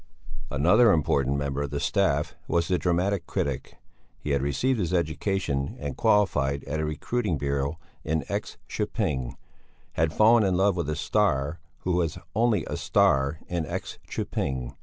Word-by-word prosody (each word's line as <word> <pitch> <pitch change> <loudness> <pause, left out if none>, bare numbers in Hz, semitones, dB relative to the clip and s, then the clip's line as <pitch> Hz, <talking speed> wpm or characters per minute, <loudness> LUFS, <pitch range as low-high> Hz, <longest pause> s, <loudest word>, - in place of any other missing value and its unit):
Another 105 - +5
important 70 -4 +2
member 70 0 -2
of 70 - -2
the 70 +1 -3
staff 75 -4 +1
was 85 -1 +1
the 90 -1 +1
dramatic 90 +1 0
critic. 70 -3 -3 0.4
He 75 - -4
had 70 -1 +2
received 110 - 0
his 90 -2 0
education 80 -3 -1
and 70 -2 -4
qualified 90 -11 +2
at 75 +3 -3
a 80 - 0
recruiting 90 +4 -1
bureau 70 +2 -1 0.3
in 80 -2 -1
X - - -4
köping; 65 -2 -2 0.6
had 80 0 +1
fallen 110 +5 +5
in 95 -3 +2
love 95 0 +3
with 85 -3 -2
a 75 - -1
"star" 80 -3 +1 0.2
who 90 - -1
was 85 -3 0 0.2
only 110 -4 +2
a - - -4
"star" 70 +3 +2
in 85 -2 -2
X - - -5
köping. 65 -2 -3
80 Hz, 160 wpm, -26 LUFS, 70-95 Hz, 0.6 s, Another